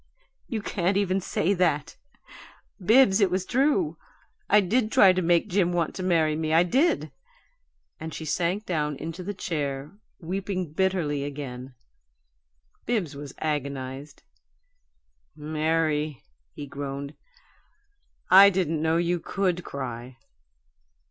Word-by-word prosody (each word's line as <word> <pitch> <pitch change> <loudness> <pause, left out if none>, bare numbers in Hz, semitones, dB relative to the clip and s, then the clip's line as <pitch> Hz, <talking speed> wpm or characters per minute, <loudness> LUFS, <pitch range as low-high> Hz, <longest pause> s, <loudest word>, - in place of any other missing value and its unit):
"You 225 -6 -4
can't 190 0 0
even 195 -1 +1
say 185 +1 0
that! 165 -6 0 0.9
Bibbs, 220 -1 +5
it 195 - +4
was 185 +1 -1
true: 290 - +1 0.5
I 210 - +6
did 215 +4 +1
try 190 -2 +6
to 185 - 0
make 170 -1 +2
Jim 180 -1 +1
want 170 -2 0
to - - -6
marry 165 -4 +2
me. 155 0 0
I 165 - +6
did!" 270 - +1 0.9
And 160 +1 -6
she 160 - -7
sank 180 +6 -1
down 150 -4 -1
into 165 +5 -6
the 205 +2 -5
chair, 145 -5 -3 0.3
weeping 185 -2 -4
bitterly 165 -6 0
again. 135 -3 -7 1.1
Bibbs 215 -10 -1
was 140 -1 -9
agonized. 140 -1 -4 1.1
"Mary," 155 -2 -1 0.3
he 145 - -6
groaned, 140 0 -6 1.2
"I 195 +2 +10
didn't 170 -5 -1
know 160 +1 +2
you 175 +1 0
COULD 180 -1 -1
cry!" 125 -3 -7
165 Hz, 120 wpm, -26 LUFS, 145-190 Hz, 1.2 s, I